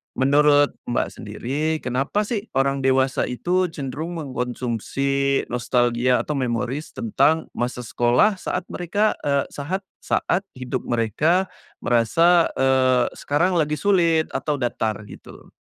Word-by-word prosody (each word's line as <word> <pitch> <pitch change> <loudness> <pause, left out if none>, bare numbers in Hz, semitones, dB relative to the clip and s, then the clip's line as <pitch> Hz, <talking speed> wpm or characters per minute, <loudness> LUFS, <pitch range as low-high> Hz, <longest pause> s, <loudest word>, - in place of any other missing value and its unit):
menurut 145 +1 +4 0.2
Mbak 120 - 0
sendiri, 140 +9 -3
kenapa 135 +11 0
sih 210 0 -3
orang 135 +1 +1
dewasa 130 0 +2
itu 180 +9 0
cenderung 155 +2 -5
mengkonsumsi 135 0 -1
nostalgia 120 +1 +1
atau 150 -2 -3
memories 125 +4 -3
tentang 160 -8 +1
masa 125 0 -3
sekolah 120 - +2
saat 185 - -3
mereka, 205 +5 0
e 140 -1 +1
sahat 170 +7 -4 0.2
saat 195 +3 0
hidup 130 0 -4
mereka 150 - +1 0.3
merasa, 165 +9 +4
eee, 130 -2 +3
sekarang 175 +5 +1
lagi 150 -1 0
sulit, 170 -4 +2
atau 150 -1 -1
datar 115 -4 -2
gitu? - - -13
140 Hz, 120 wpm, -22 LUFS, 125-165 Hz, 0.3 s, menurut